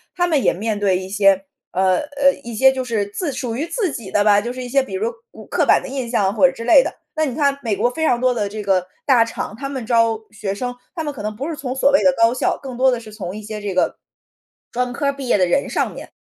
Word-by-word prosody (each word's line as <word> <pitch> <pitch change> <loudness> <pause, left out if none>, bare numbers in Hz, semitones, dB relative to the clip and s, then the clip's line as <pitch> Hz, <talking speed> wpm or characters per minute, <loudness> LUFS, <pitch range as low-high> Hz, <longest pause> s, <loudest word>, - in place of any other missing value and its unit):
他 355 - +2
们 310 -6 +1
也 - - +4
面 210 +2 -3
对 195 -3 +2
一 185 - -6
些 195 -1 +3 0.3
呃， 185 0 +3
呃， 285 -2 +2
一 235 -1 -7
些 265 +4 +6
就 260 -1 -3
是 225 -5 -1
自 290 - -3
属 245 -4 -4
于 295 +7 -2
自 390 -2 -1
己 225 -8 -7
的 205 - +2
吧， 205 -1 +5
就 235 +3 -4
是 255 0 -6
一 - - -6
些 275 +2 +3
比 265 - -8
如 440 +5 -1 0.2
古 - - -12
刻 - - 0
板 - - +5
的 - - -6
印 260 -3 -4
象 200 -5 +1
或 270 +4 +5
者 - - -1
之 230 - -8
类 245 - +7
的。 - - -5 0.2
那 315 -1 +1
你 260 -4 -3
看 280 -2 +1
美 220 -4 -1
国 235 +5 +1
非 320 +5 -2
常 240 - +2
多 255 -1 +3
的 210 -4 -1
这 210 +1 -6
个 185 -2 +1 0.2
大 250 -5 +5
厂， 225 -2 -5
他 275 +4 -5
们 265 -4 -5
招 230 -1 +3
学 210 -2 -4
生， 245 +3 -3 0.2
他 320 - -3
们 295 -1 -3
可 255 - -8
能 215 0 -4
不 280 +8 -4
是 325 - -3
从 260 -4 -4
所 275 +1 +3
谓 285 - +4
的 275 - +5
高 230 +1 +5
校， - - 0
更 260 -3 -7
多 260 +1 +4
的 245 -2 0
是 215 -2 -12
从 190 -3 -6
一 215 - -6
些 215 0 -6
这 200 -2 -3
个， 185 - +1 0.7
专 250 +1 -1
科 280 - -1
儿 280 - +1
毕 275 -2 -7
业 240 - +3
的 185 - +3
人 225 +11 0
上 - - -1
面。 - - -10
240 Hz, 315 characters per minute, -20 LUFS, 210-275 Hz, 0.7 s, 类